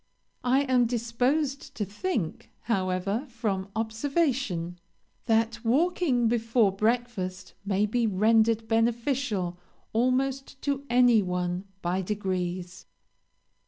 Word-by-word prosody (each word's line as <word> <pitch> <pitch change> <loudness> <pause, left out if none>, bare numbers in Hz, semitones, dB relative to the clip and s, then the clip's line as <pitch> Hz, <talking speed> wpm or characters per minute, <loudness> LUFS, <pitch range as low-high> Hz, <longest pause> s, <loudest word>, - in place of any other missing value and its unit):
I 255 +2 +3
am 255 -3 +3
disposed 250 +5 -1
to 210 - -2
think, 205 - -3
however, 195 +3 -1
from 205 -5 -2
observation, 225 - -1 0.5
that 225 0 +1
walking 270 -1 +2
before 230 -2 +2
breakfast 210 -3 -2
may 200 0 +1
be 230 +2 +1
rendered 220 +2 +3
beneficial 230 -5 0 0.3
almost 265 +3 0
to 280 -1 -1
any 240 -2 +5
one 180 0 -2 0.2
by 180 +2 0
degrees. 185 -2 -3
225 Hz, 95 wpm, -27 LUFS, 195-250 Hz, 0.5 s, any